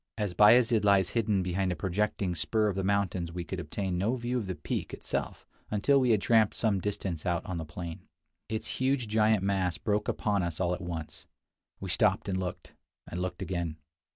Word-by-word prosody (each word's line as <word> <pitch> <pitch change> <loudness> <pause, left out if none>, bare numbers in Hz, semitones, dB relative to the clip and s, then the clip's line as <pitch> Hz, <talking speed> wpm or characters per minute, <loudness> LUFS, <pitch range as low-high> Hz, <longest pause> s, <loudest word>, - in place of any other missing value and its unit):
As 105 -4 -1
Bayazid 115 +3 +6
lies 100 -3 +4
hidden 105 -5 +1
behind 90 +1 0
a - - -1
projecting 95 +1 -1
spur 105 +7 0
of 100 - -1
the 95 - -1
mountains 95 -3 0
we 90 +1 -4
could 95 +2 -5
obtain 90 0 -3
no 110 +7 +1
view 120 0 -3
of 105 - -5
the 95 - -3
peak - - -4
itself - - -4 0.2
until 120 +7 +3
we 130 -2 +2
had 110 -3 +4
tramped 110 -3 +4
some 105 -4 +1
distance 95 -5 -3
out 85 -2 -1
on 90 -2 -4
the 80 - -4
plain. 80 +2 -7 0.4
Its 110 0 -3
huge 130 -2 +1
giant 110 -1 +3
mass 95 -3 0
broke 105 -1 -1
upon 105 -2 0
us 85 -3 -3
all 90 -1 +1
at - - -4
once. 85 -3 -6 0.5
We 95 -2 -4
stopped 105 +2 +2
and 95 -1 -1
looked 90 -1 -5 0.2
— - - -45
and 85 - -3
looked 90 +1 -3
again. 85 -4 -3
95 Hz, 205 wpm, -29 LUFS, 90-105 Hz, 0.5 s, Bayazid